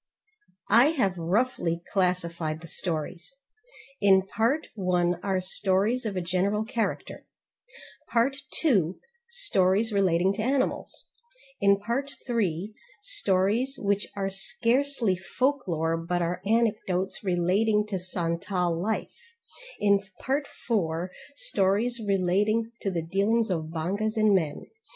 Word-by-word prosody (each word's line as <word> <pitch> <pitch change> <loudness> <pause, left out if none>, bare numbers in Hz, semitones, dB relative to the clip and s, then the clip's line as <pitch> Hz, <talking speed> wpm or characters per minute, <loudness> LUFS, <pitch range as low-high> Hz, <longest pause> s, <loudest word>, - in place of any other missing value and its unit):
I 235 +4 +8
have 195 -5 +2
roughly 175 -1 0
classified 170 -4 0
the - - -10
stories: 170 - -4 0.6
in 190 -2 +5
part 230 +10 0
1 180 -3 +1
are 195 -2 0
stories 195 +6 +1
of 205 - -4
a - - 0
general 190 +5 0
character; 230 0 -3 0.8
part 245 +4 +2 0.2
2, 190 - +2 0.3
stories 220 - +2
relating 190 -1 +3
to 215 - -3
animals; 260 +3 -1 0.5
in 200 0 +5
part 240 +7 -2
3, 210 -5 -1 0.3
stories 235 - +1
which 200 0 0
are 195 -1 -2
scarcely 235 +3 0
folklore 185 - 0
but 175 +1 -1
are 175 +2 -2
anecdotes 210 -5 0
relating 200 +4 +2
to 200 -3 -3
Santal 175 0 -1
life; 205 +6 -2 0.7
in 200 -1 +4 0.2
Part 280 +2 -1
4, 180 -5 -2 0.2
stories 220 +1 +1
relating 205 +4 +1
to 195 - -1
the 170 -3 -2
dealings 200 +6 +1
of 160 -3 -1
bongas 190 +8 -2
and 215 -1 +4
men. 160 -6 0
195 Hz, 115 wpm, -27 LUFS, 180-225 Hz, 0.8 s, I